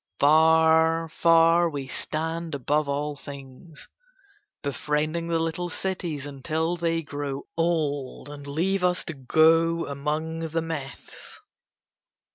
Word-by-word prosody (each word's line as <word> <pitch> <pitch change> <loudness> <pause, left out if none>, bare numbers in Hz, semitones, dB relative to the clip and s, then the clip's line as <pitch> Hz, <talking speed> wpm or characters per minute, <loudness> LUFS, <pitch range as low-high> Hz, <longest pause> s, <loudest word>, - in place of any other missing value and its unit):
"Far, 160 +2 +4
far, 165 +1 +4
we 140 -3 -5
stand 160 +3 -3
above 145 +2 0
all 145 +1 -2
things; 140 +3 -11 0.8
befriending 150 +4 -1
the 165 -1 +1
little 165 +2 -2
cities 175 -6 -3
until 155 +4 -2
they 165 -1 -1
grow 145 -1 -5
old 150 -6 -1
and 145 -1 -9
leave 180 +6 0
us 180 0 +2
to 170 - -4
go 165 +4 +3
among 150 +3 -3
the 165 +1 -1
myths. 150 -5 -7
160 Hz, 110 wpm, -25 LUFS, 145-165 Hz, 0.8 s, Far